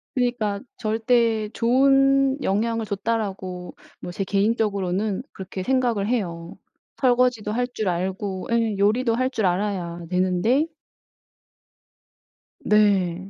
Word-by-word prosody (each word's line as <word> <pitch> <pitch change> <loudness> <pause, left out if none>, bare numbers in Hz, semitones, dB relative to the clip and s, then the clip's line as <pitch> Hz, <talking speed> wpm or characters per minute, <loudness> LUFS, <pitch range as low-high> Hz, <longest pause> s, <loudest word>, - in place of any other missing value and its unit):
그니까 240 -5 0 0.2
'절대 225 0 +1
좋은 270 +2 +3
영향을 225 +3 0
줬다.'라고 195 -4 -3 0.2
뭐 - - -7
제 195 - -3
개인적으로는 200 -1 0
그렇게 190 0 -6
생각을 240 -4 +1
해요. 175 -8 -3 0.5
설거지도 245 -4 +2
할 245 +3 0
줄 215 - -2
알고 190 +2 -3
예 230 -2 +1
요리도 225 +4 +2
할 255 +2 0
줄 220 -5 -1
알아야 175 -2 -2
되는데 185 - +1 1.9
네. 195 -4 +2
210 Hz, 230 characters per minute, -23 LUFS, 190-240 Hz, 1.9 s, 좋은